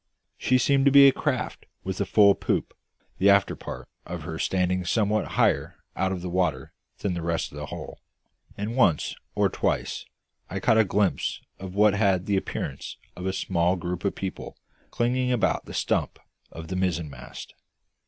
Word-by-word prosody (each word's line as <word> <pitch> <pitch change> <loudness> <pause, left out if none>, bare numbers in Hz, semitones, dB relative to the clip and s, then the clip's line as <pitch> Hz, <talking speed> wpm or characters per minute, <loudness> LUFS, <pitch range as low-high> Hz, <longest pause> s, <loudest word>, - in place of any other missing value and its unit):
She 130 - +3
seemed 135 +1 +3
to 140 - +6
be 140 0 +9
a - - +7
craft - - -3 0.2
with 95 +1 -3
a 100 - -1
full 100 0 +6
poop, - - -2 0.5
the 100 - +5
after 100 0 +4
part - - -8 0.2
of 85 -2 -6
her 80 0 -5
standing 90 0 0
somewhat 105 +3 0
higher - - +2 0.2
out 95 0 0
of 90 -2 -4
the 90 - -3
water 85 -8 -1 0.3
than 100 - 0
the 85 - -3
rest 85 0 -2
of 75 - -10
the 75 - -5
hull; - - -8 0.6
and 105 +4 -3
once 95 - +3 0.2
or - - +3
twice - - -2 0.5
I - - -3
caught 110 - +3
a 110 - +5
glimpse 100 0 0 0.2
of 95 0 -8
what 105 0 +5
had 100 -3 +2
the 100 - +1
appearance 95 - -4 0.2
of 90 +1 -5
a - - +1
small 90 -1 +1
group 90 -1 -4
of 100 - 0
people 95 -1 -6 0.3
clinging 125 +1 0
about 120 -3 +1
the - - -10
stump - - 0 0.3
of 80 0 -9
the 95 - -3
mizzenmast. 85 -5 -4
95 Hz, 180 wpm, -26 LUFS, 90-105 Hz, 0.6 s, be